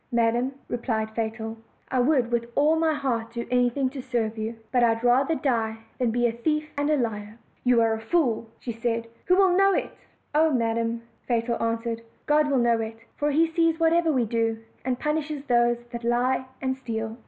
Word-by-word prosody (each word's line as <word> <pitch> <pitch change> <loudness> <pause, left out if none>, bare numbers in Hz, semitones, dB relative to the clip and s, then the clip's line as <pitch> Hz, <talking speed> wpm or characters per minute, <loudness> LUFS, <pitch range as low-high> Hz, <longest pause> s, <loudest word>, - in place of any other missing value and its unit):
"Madam," 235 +2 +1
replied 220 -2 -2
Fatal, 225 0 -3 0.3
"I 255 - +1
would 250 -2 +2
with 235 0 0
all 300 +3 +4
my 320 0 +2
heart 235 -5 -2
do 235 0 -3
anything 250 +2 +2
to 270 -1 -6
serve 235 -4 -1
you, 220 +1 -4 0.2
but 250 - +3
I 230 -1 +4
had 225 - -9
rather 265 +6 +3
die 225 -6 0 0.2
than 250 -2 +2
be 240 +2 +1
a 235 - +3
thief 305 +6 -1
and 290 +1 0
a 305 - +3
liar." 215 -3 -3 0.3
"You 245 -2 +4
are 225 -1 +2
a 220 - -3
fool," 230 -4 0
said 230 -2 -7
she; 230 -1 0 0.2
"who 365 - +4
will 375 -2 +4
know 390 +1 +4
it?" - - -2 0.4
"Oh, 315 +2 +4
madam," 230 -2 0 0.2
Fatal 235 -1 0
answered, 230 0 -1 0.2
"God 300 0 +3
will 275 - +2
know 235 -2 +3
it; 225 0 -6
for 295 - 0
He 310 +3 +4
sees 330 0 +1
whatever 330 0 +3
we 255 -5 +2
do, 225 0 0 0.3
and 255 -1 -1
punishes 300 -1 -2
those 240 -1 +3
that 235 -1 -6
lie 245 +2 +1 0.2
and 260 0 0
steal." 225 -3 -4
240 Hz, 200 wpm, -26 LUFS, 230-285 Hz, 0.4 s, all